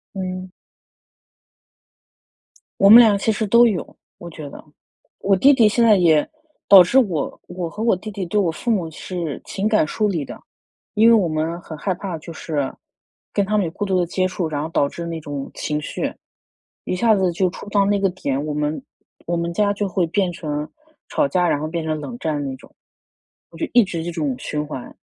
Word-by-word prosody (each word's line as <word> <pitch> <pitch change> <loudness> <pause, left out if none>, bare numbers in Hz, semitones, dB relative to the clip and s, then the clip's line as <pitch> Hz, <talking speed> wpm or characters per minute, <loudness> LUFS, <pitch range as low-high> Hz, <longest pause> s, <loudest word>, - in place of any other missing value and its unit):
嗯。 185 -1 -5 2.3
我 195 - +6
们 225 +3 +11
俩 220 -4 +6
其 220 +3 0
实 215 0 -2
都 235 +4 +6
有， 205 -8 -2 0.2
我 175 - -8
觉 155 -3 -9
得。 - - -11 0.6
我 195 0 +2
弟 270 +9 +6
弟 235 -5 +5
现 230 +3 +2
在 220 -2 +6
也 165 -5 +3 0.4
导 195 -2 +10
致 245 +10 +4
我 180 - -2
我 180 -1 -5
和 210 +6 -8
我 230 - +3
弟 210 +4 -8
弟 200 -1 -5
对 210 +4 +1
我 180 -5 +1
父 200 +9 -5
母 190 -8 0
是 170 -2 -5
情 200 +2 -2
感 215 -7 +3
疏 215 +5 0
离 170 -7 -1
的。 - - -9 0.5
因 220 +2 +4
为 230 - +7
我 205 -6 +4
们 160 +2 -2
很 160 -2 -9
害 185 +5 -1
怕， 180 -1 -5
就 165 +2 -10
是 145 -4 -3 0.6
跟 200 - +1
他 210 +2 -1
们 200 - +1
有 165 - -4
过 205 +4 -4
多 190 -2 +1
的 175 - +1
接 185 +2 0
触， 185 -2 -3
然 150 -2 -3
后 155 - -3
导 145 -3 +1
致 170 - -7
那 165 -1 -4
种 145 -2 -6
情 150 0 -3
绪， - - -3 0.7
一 - - -2
下 220 +3 +3
子 190 -3 +1
就 185 +2 +1
触 200 - -10
到 200 -1 +2
那 200 0 +1
个 195 -1 +2
点， 145 -6 -3
我 150 - -3
们 150 - -2 0.4
我 175 0 0
们 170 0 -2
家 205 +3 +2
就 205 0 -2
会 180 -1 0
变 185 +1 0
成 150 -3 -4 0.4
吵 295 - +1
架， 180 -7 +1
然 145 - +1
后 155 - -3
变 165 +1 -3
成 155 -1 -2
冷 240 +9 -7
战 150 -3 -2
那 135 -1 -4
种。 130 - -18 0.8
我 - - -13
就 325 - -2
一 240 -1 +7
直 170 -4 -4
这 175 - -4
种 150 -6 -2
循 150 +2 -3
环。 140 -4 -8
180 Hz, 230 characters per minute, -21 LUFS, 155-205 Hz, 2.3 s, 们